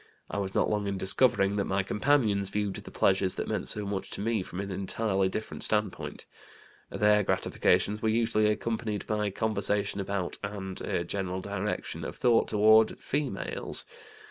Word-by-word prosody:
I -, -, -2 dB
was 95 Hz, -1 st, -3 dB
not -, -, +3 dB
long 105 Hz, -1 st, -1 dB
in 100 Hz, -1 st, -2 dB
discovering 95 Hz, 0 st, +2 dB
that 100 Hz, -, +1 dB
my 95 Hz, 0 st, 0 dB
companions 105 Hz, -3 st, +2 dB
viewed 105 Hz, -1 st, -1 dB
the -, -, -8 dB
pleasures 95 Hz, -1 st, +2 dB
that -, -, -3 dB
meant -, -, -2 dB
so 105 Hz, -1 st, 0 dB
much 100 Hz, -1 st, -3 dB
to -, -, -5 dB
me 110 Hz, -1 st, 0 dB
from 90 Hz, 0 st, -7 dB
an 100 Hz, 0 st, -4 dB
entirely 95 Hz, 0 st, 0 dB
different 110 Hz, +3 st, -5 dB
standpoint. 105 Hz, -3 st, -1 dB, 0.6 s
Their 105 Hz, 0 st, +3 dB
gratifications 105 Hz, +1 st, +1 dB
were 110 Hz, -, +1 dB
usually 110 Hz, -1 st, +2 dB
accompanied 110 Hz, 0 st, -1 dB
by 105 Hz, -1 st, 0 dB
conversation 100 Hz, -1 st, -1 dB
about, 95 Hz, -2 st, -3 dB
and 100 Hz, -2 st, -5 dB
a 85 Hz, -, -1 dB
general 95 Hz, -1 st, -3 dB
direction 100 Hz, +1 st, -3 dB
of -, -, -5 dB
thought 120 Hz, -2 st, +3 dB
toward, 110 Hz, +1 st, +5 dB
females. 145 Hz, 0 st, -3 dB
105 Hz, 165 wpm, -29 LUFS, 95-110 Hz, 0.6 s, toward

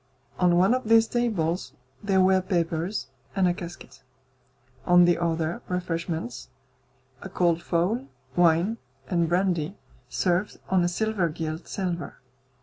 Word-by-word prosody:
On 175 Hz, -1 st, +4 dB
one 190 Hz, +6 st, +4 dB
of 255 Hz, -1 st, -1 dB
these 225 Hz, 0 st, +6 dB
tables 185 Hz, -, -1 dB, 0.3 s
there 195 Hz, -2 st, +2 dB
were 190 Hz, 0 st, +4 dB
papers 175 Hz, -1 st, -1 dB, 0.3 s
and 190 Hz, -2 st, +3 dB
a 175 Hz, -, +2 dB
casket, 170 Hz, -6 st, -10 dB, 0.8 s
on 175 Hz, +2 st, +6 dB
the 175 Hz, -1 st, +3 dB
other 165 Hz, -1 st, -1 dB
refreshments; 165 Hz, -7 st, -3 dB, 0.7 s
a 195 Hz, -, -7 dB
cold 170 Hz, -2 st, +1 dB
fowl, 195 Hz, +12 st, 0 dB, 0.3 s
wine, 175 Hz, +6 st, +3 dB, 0.3 s
and 170 Hz, -2 st, +2 dB
brandy, 180 Hz, 0 st, 0 dB, 0.3 s
served 180 Hz, +9 st, 0 dB
on 185 Hz, -2 st, +4 dB
a -, -, +2 dB
silver 195 Hz, -1 st, 0 dB
gilt 160 Hz, +1 st, -5 dB
salver. 180 Hz, -4 st, -3 dB
175 Hz, 130 wpm, -26 LUFS, 170-190 Hz, 0.8 s, these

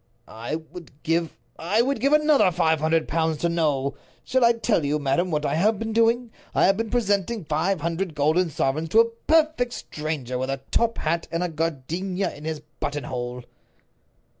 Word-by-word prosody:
"I 115 Hz, +7 st, -5 dB
would 160 Hz, -2 st, -11 dB
give—I 170 Hz, +5 st, -1 dB
would 275 Hz, -1 st, -1 dB
give 275 Hz, +5 st, +2 dB
another 300 Hz, -8 st, +5 dB
five 160 Hz, -1 st, +2 dB
hundred 160 Hz, +1 st, +1 dB
pounds 160 Hz, -1 st, 0 dB
to 170 Hz, -, 0 dB
know. 145 Hz, -5 st, 0 dB, 0.3 s
Shall 260 Hz, -1 st, +1 dB
I 235 Hz, 0 st, +6 dB
tell 225 Hz, -7 st, 0 dB
you, 145 Hz, +1 st, +1 dB
madam, 145 Hz, +5 st, 0 dB
what 150 Hz, -2 st, -1 dB
I -, -, 0 dB
have 210 Hz, +6 st, +2 dB
been 225 Hz, +1 st, -4 dB
doing? 230 Hz, +1 st, +2 dB, 0.2 s
I -, -, +4 dB
have 195 Hz, -, +4 dB
been 225 Hz, +2 st, -3 dB
presenting 205 Hz, -3 st, 0 dB
five 160 Hz, +4 st, 0 dB
hundred 170 Hz, +1 st, -2 dB
golden 160 Hz, +5 st, +2 dB
sovereigns 155 Hz, +2 st, -1 dB
to 220 Hz, -, +5 dB
a 230 Hz, -, +1 dB, 0.2 s
perfect 310 Hz, -6 st, +3 dB
stranger, 150 Hz, -5 st, -4 dB
with 130 Hz, +1 st, -2 dB
a 135 Hz, 0 st, -3 dB
top 230 Hz, 0 st, +1 dB
hat, 165 Hz, +2 st, -1 dB
and 165 Hz, +1 st, -1 dB
a 180 Hz, -, -1 dB
gardenia 165 Hz, +5 st, -2 dB
in 150 Hz, -, -11 dB
his 160 Hz, -2 st, -3 dB, 0.2 s
buttonhole." 125 Hz, -3 st, -4 dB
165 Hz, 180 wpm, -24 LUFS, 150-220 Hz, 0.3 s, I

